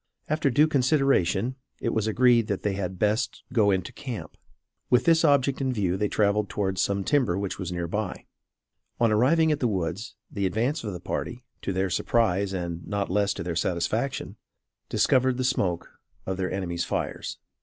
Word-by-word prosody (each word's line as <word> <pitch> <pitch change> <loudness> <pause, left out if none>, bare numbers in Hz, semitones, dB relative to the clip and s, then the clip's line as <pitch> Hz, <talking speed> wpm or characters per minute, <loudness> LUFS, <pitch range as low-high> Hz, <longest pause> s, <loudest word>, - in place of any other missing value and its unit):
After 155 -1 +1
due 145 +5 +4
consultation, 130 - +2 0.2
it 115 - -1
was 110 -1 0
agreed 120 0 +4
that 100 - -2
they 105 - 0
had 95 -1 -3
best 105 +5 0
go 110 -5 +4
into 95 -3 0
camp. 125 -6 -7 0.5
With 125 - +4
this 165 -1 +5
object 140 -3 +3
in 130 -1 +1
view 95 -7 0
they 105 +2 0
traveled 105 0 +1
towards 95 -2 -1
some 100 -1 0
timber 125 -8 +2
which 100 -1 -3
was 90 -2 -4
near 85 -1 -2
by. 105 +1 -3 0.7
On 115 -2 +3
arriving 155 +9 +4
at 150 - 0
the 125 - +2
woods, 95 +1 -3 0.2
the 100 -2 0
advance 120 - -1
of 105 -3 -4
the 90 - -6
party, - - -4 0.2
to - - -2
their 95 0 -1
surprise 100 -2 +1
and 85 -2 -4
not 100 -3 -2
less 100 +1 +2
to - - -4
their 85 -1 -3
satisfaction, 95 +10 -1 0.5
discovered 130 -1 +3
the 130 - -1
smoke 90 -9 -1 0.3
of 95 0 -3
their 95 -1 -2
enemies' 90 -3 -2
fires. - - -3
105 Hz, 180 wpm, -26 LUFS, 95-125 Hz, 0.7 s, this